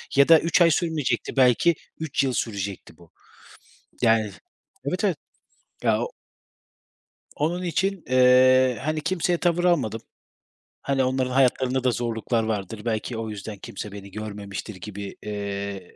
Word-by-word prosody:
ya 140 0 +6
da 165 -2 +8
3 165 +2 +2
ay 170 -1 +6
sürmeyecekti 160 -8 -1
belki 130 +6 +4 0.2
3 155 -3 0
yıl 130 -2 0
sürecekti 100 -5 -4
bu 85 -2 -19 0.9
yani, 110 -3 +3 0.5
evet, - - -2
evet. - - +2 0.7
Ya - - +2
o 485 - -4 1.2
Onun 170 +5 -1
için, 190 +1 -1
eee, 130 0 +5
hani, 155 +1 -1
kimseye 175 +1 0
tavır 175 0 +1
almadım. 135 -11 +1 0.8
Hani, 135 -1 +1
onların 130 0 0
hayatlarında 130 0 +2
da 130 - +3
zorluklar 115 -1 -1
vardır, 105 -1 -3
belki 115 +1 -2
o 110 -1 -4
yüzden 105 0 -7
kimse 100 +1 -7
beni 100 0 -10
görmemiştir 105 0 -6
gibi, 100 +1 -7
eee 100 -2 -5
125 Hz, 135 wpm, -24 LUFS, 105-150 Hz, 1.2 s, da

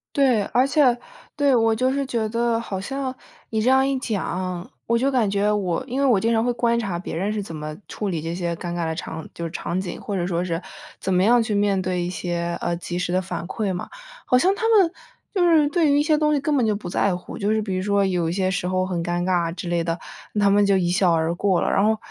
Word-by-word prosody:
对， 260 -7 +4
而 255 +2 +2
且， 275 -4 +3 0.4
对， 285 -2 +3
我 225 -2 +3
就 255 +3 +1
是 280 0 0
觉 230 -4 -1
得 230 +1 +1
好 200 -5 -4
像 265 +5 -3 0.4
你 220 - 0
这 250 - +3
样 265 0 +4
一 275 0 0
讲， 185 -6 -3 0.2
我 235 0 +2
就 260 +3 +1
感 240 -7 +2
觉 200 +1 +1
我 195 0 -1
因 260 +1 -2
为 280 - +3
我 235 -6 +4
经 230 +4 +1
常 225 0 +2
会 245 - +1
观 235 -1 +1
察 195 -6 -3
别 175 - -6
人 195 +6 -1
是 215 - -2
怎 195 -5 -7
么 155 0 -6
处 210 - -4
理 170 -4 -2
这 165 +2 -4
些 170 -1 -2
尴 175 0 -5
尬 175 -1 -1
的 160 - -1
场 160 -1 -6
就 170 0 -5
场 175 +2 -3
景， 185 -2 -6
或 200 - -4
者 175 -2 -1
说 175 -1 -1
是 170 -2 -2 0.4
怎 190 - -1
么 180 - +3
样 240 +4 +5
去 220 -2 -1
面 200 -1 +2
对 185 -1 -1
一 175 - -3
些， 170 -1 -3
呃， 170 - -1
及 175 0 -4
时 180 -1 -2
的 185 +1 +1
反 175 -1 -5
馈 200 +1 -2
嘛。 180 - -5 0.4
好 250 - +4
像 360 +10 +4
他 450 - -1
们 405 -7 +5 0.4
就 370 -4 +2
是 310 -3 +5
对 310 -2 +2
于 285 - +4
一 - - +4
些 305 0 +2
东 300 0 +2
西 285 - +1
根 290 +1 0
本 245 - +2
就 215 - +2
不 200 -3 -6
在 190 +1 +1
乎， 180 - -7
就 205 +1 0
是 220 0 +1
比 195 -3 -3
如 185 - -1
说 200 0 +2
有 180 -3 0
一 - - -1
些 185 0 0
时 180 -1 -2
候 185 0 +1
很 180 -3 -2
尴 175 0 -1
尬 175 -2 0
之 175 - -6
类 170 -1 0
的， 165 0 -1 0.4
他 200 -1 +4
们 205 0 +4
就 200 -1 +4
一 175 -2 +1
笑 180 -1 +3
而 160 0 +1
过 190 -1 +2
了。 - - 0
然 - - +3
后， 220 +1 +3
200 Hz, 295 characters per minute, -23 LUFS, 175-240 Hz, 0.4 s, 样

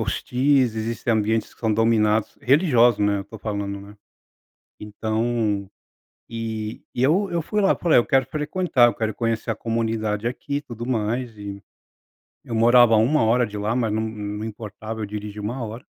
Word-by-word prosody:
hostis, 130 -2 +1
existem 115 +2 -2
ambientes 110 0 0
que - - -28
são 110 -2 +1
dominados 110 -1 +2
religiosos, 125 - +4
né, 100 0 +2
eu - - -3
estou 110 +3 -12
falando, 100 -2 -4
né. 100 +1 -13 0.8
Então, 110 -1 -2 0.6
e 110 -1 -5
e 125 - -1
eu 185 +8 +2
eu 170 -1 0
fui 210 +6 -1
lá, 195 - +4
falei: 170 -6 +3
"Eu 120 - 0
quero 135 0 +2
frequentar, 150 -5 +2
quero 110 -1 -2
conhecer 115 -1 -2
a - - -3
comunidade 115 -1 -1
aqui 140 +3 -4
e 145 - -1
tudo 120 -4 -8
mais" 120 -1 -2
e, 100 -1 -7 0.8
eu 115 - -5
morava 120 0 +6
1 120 +8 +3
hora 120 +2 +3
de 105 -1 -7
lá, 105 +3 -1
mas 115 -4 0
não 110 - 0
não 105 0 -5
importava, 110 0 -7
eu - - -2
dirigia 105 0 -6
1 120 +5 -4
hora. 115 +4 -7
115 Hz, 175 wpm, -23 LUFS, 105-125 Hz, 0.8 s, morava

